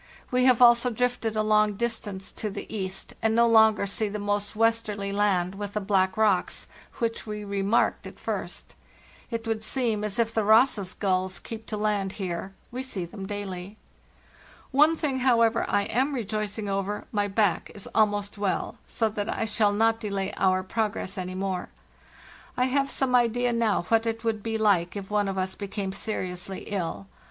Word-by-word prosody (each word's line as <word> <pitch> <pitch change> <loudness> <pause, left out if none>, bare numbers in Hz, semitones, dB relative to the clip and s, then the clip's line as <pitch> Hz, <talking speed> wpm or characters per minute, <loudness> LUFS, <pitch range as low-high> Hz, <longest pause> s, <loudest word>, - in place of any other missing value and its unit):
We 250 0 +3
have 250 -1 +6
also 240 +1 +6
drifted 245 -1 -1
a 215 - +2
long 215 -1 +3
distance 205 -4 -3
to 215 - -4
the 195 - -6
east, 190 -2 -4
and 220 0 +2
no 235 0 +5
longer 220 -2 +5
see 205 +2 -1
the 210 - -4
most 205 0 -2
westerly 215 -3 +1
land 195 -3 +1
with 200 0 -6
the 210 - 0
black 190 -1 +1
rocks, 210 -4 +1 0.3
which 230 -1 -2
we 210 0 -4
remarked 200 +2 +1
at - - -12
first. - - -4 0.6
It 230 -1 -4
would 225 -1 -2
seem 225 -3 0
as 210 -2 -1
if 230 -1 +1
the 220 - +1
Ross's 215 -3 +4
gulls 185 -1 0
keep 225 -1 -8
to 215 - -3
land 205 -2 0
here; 190 0 -4 0.2
we 250 +2 -4
see 210 -9 -4
them 195 +2 -8
daily. 200 -1 -5 0.9
"One 300 +4 +5
thing, 280 -5 -1
however, 230 -3 +3
I 205 - +2
am 265 +7 0
rejoicing 215 -2 -3
over; 195 +1 -2
my 205 -1 +1
back 200 -2 +1
is 200 - -6
almost 205 -1 +1
well, 200 -2 -1
so 225 - 0
that 210 -1 -3
I - - -1
shall 210 -1 +2
not 225 +2 +2
delay 200 -3 -3
our 185 -1 +2
progress 205 -1 -2
any 185 -1 -4
more. 190 -1 -2 0.9
I 250 - +3
have 275 +1 +1
some 265 -2 -1
idea 245 0 +3
now 230 -5 +1
what 225 +4 +2
it 225 0 -2
would 225 -2 -1
be 225 +1 -2
like 200 -5 +2
if 200 0 -6
one 205 -1 +2
of 195 0 -3
us 190 0 -1
became 200 -1 -4
seriously 185 -2 -4
ill. 195 -1 -4
210 Hz, 180 wpm, -27 LUFS, 195-225 Hz, 0.9 s, have